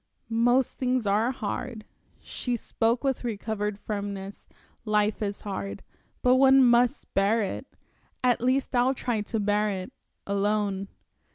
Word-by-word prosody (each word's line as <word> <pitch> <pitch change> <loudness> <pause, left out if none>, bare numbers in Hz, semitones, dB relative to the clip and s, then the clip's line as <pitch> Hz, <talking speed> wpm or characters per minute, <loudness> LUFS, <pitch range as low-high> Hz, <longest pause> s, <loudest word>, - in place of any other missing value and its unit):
"Most 245 +3 +2
things 255 -2 0
are 210 +4 +2
hard." 230 -2 -5 0.3
She 245 -1 -3
spoke 230 +2 0
with 270 -2 0
recovered 210 -2 -3
firmness. 200 -1 -5 0.4
"Life 210 0 +1
is 200 -1 -3
hard, 195 -1 -5 0.4
but 250 0 +5
one 270 0 +7
must 240 0 +2
bear 210 +3 +3
it. 195 - -4 0.6
At 245 -2 +3
least 255 +2 +1
I'll 250 +2 +3
try 240 -4 -1
to 220 +2 -3
bear 210 +1 +1
it 190 +5 -5 0.3
alone. 200 -1 0
220 Hz, 130 wpm, -27 LUFS, 205-245 Hz, 0.6 s, one